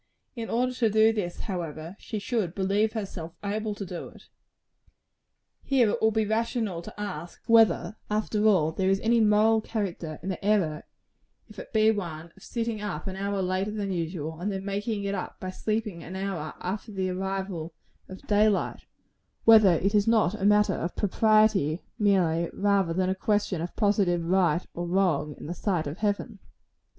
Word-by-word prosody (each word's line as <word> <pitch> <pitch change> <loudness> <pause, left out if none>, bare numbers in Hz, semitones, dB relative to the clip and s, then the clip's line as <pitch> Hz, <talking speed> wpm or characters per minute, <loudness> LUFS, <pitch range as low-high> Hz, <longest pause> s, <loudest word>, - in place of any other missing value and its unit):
In 230 -2 -5
order 250 +2 +1
to 240 -3 +1
do 220 +1 +4
this, 185 -5 -3
however, 165 -2 -5
she 220 - -5
should 205 -5 -2
believe 205 +3 +1
herself 190 -7 -5
able 210 +1 -2
to 205 - -5
do 175 -1 -6
it. - - -18 1.3
Here 250 -6 +3
it - - -3
will 220 - +5
be 220 0 +1
rational 220 -4 -1
to 175 - -11
ask 180 -5 -6
whether, 225 -1 +4
after 210 0 0
all, 170 -7 +4
there 190 +3 0
is 195 0 +2
any 230 +1 +3
moral 220 +1 +4
character 185 -9 -4
in 190 - -3
the 190 - -4
error, 190 -7 +1 0.6
if 215 -2 -11
it - - -9
be 220 0 +4
one, 170 -5 -5
of 195 - -19
sitting 230 -1 -3
up 175 -7 -4
an 190 - -4
hour 200 0 -2
later 185 +2 -1
than 205 -2 -3
usual, 165 -2 -4
and 200 +4 -2
then 195 0 -4
making 205 +1 -2
it 200 0 -2
up 190 - -5
by 185 - -5
sleeping 215 -3 -3
an 185 - -8
hour 190 -6 -4
after 205 +4 -4
the 190 -2 -2
arrival 190 -3 -4 0.3
of 190 - -10
day 210 +1 +4
light; 200 - -2 0.6
whether 220 -5 +7
it 195 +5 +1
is 205 0 +3
not 220 -5 +3
a 205 -2 -3
matter 210 0 +4
of 170 - -3
propriety, 215 -6 +3 0.2
merely, 175 -5 +2
rather 200 -3 +2
than 185 +2 0
a - - +2
question 205 -2 0
of 170 - -5
positive 195 -5 +2
right 175 -2 +2
or 175 0 -4
wrong 170 -6 +1
in - - -10
the 165 - -4
sight 180 -3 -1
of 145 +4 -6
Heaven. 210 +1 -2
200 Hz, 180 wpm, -27 LUFS, 175-215 Hz, 1.3 s, whether